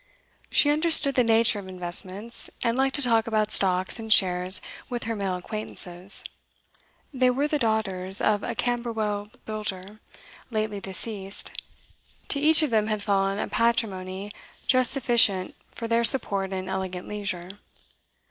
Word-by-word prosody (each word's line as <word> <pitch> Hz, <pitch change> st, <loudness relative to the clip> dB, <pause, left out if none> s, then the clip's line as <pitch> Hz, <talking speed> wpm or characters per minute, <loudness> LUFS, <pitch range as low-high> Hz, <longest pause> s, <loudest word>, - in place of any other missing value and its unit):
She 290 Hz, -, +4 dB
understood 305 Hz, -2 st, +7 dB
the 255 Hz, -, +2 dB
nature 225 Hz, -2 st, +2 dB
of 195 Hz, -, -10 dB
investments, 185 Hz, +4 st, -4 dB
and 230 Hz, 0 st, 0 dB
liked 270 Hz, +1 st, 0 dB
to 285 Hz, -, +2 dB
talk 230 Hz, -2 st, +1 dB
about 215 Hz, -1 st, -1 dB
stocks 185 Hz, +3 st, +1 dB
and 220 Hz, -1 st, -7 dB
shares 185 Hz, -1 st, +4 dB, 0.3 s
with 240 Hz, -2 st, -5 dB
her 225 Hz, 0 st, -4 dB
male 195 Hz, -3 st, -3 dB
acquaintances. 185 Hz, -1 st, -4 dB, 0.9 s
They 255 Hz, -1 st, +2 dB
were 275 Hz, +4 st, 0 dB
the 300 Hz, 0 st, -2 dB
daughters 195 Hz, -5 st, +2 dB
of 210 Hz, -1 st, +1 dB
a -, -, -5 dB
Camberwell 225 Hz, -4 st, -3 dB, 0.2 s
builder, 210 Hz, -1 st, -6 dB, 0.5 s
lately 215 Hz, -3 st, -3 dB
deceased; 195 Hz, +1 st, -3 dB, 0.8 s
to 285 Hz, -, 0 dB
each 310 Hz, +2 st, +6 dB
of 295 Hz, -, -1 dB
them 215 Hz, -1 st, +1 dB
had 215 Hz, -2 st, -3 dB
fallen 195 Hz, -1 st, 0 dB
a -, -, -3 dB
patrimony 200 Hz, -4 st, -2 dB, 0.3 s
just 255 Hz, -2 st, +4 dB
sufficient 235 Hz, -8 st, +3 dB, 0.2 s
for 230 Hz, -, -7 dB
their 230 Hz, +1 st, +1 dB
support 200 Hz, -6 st, +4 dB
in 185 Hz, -1 st, -5 dB
elegant 190 Hz, -1 st, -5 dB
leisure. 195 Hz, -4 st, -4 dB
215 Hz, 145 wpm, -25 LUFS, 190-235 Hz, 0.9 s, understood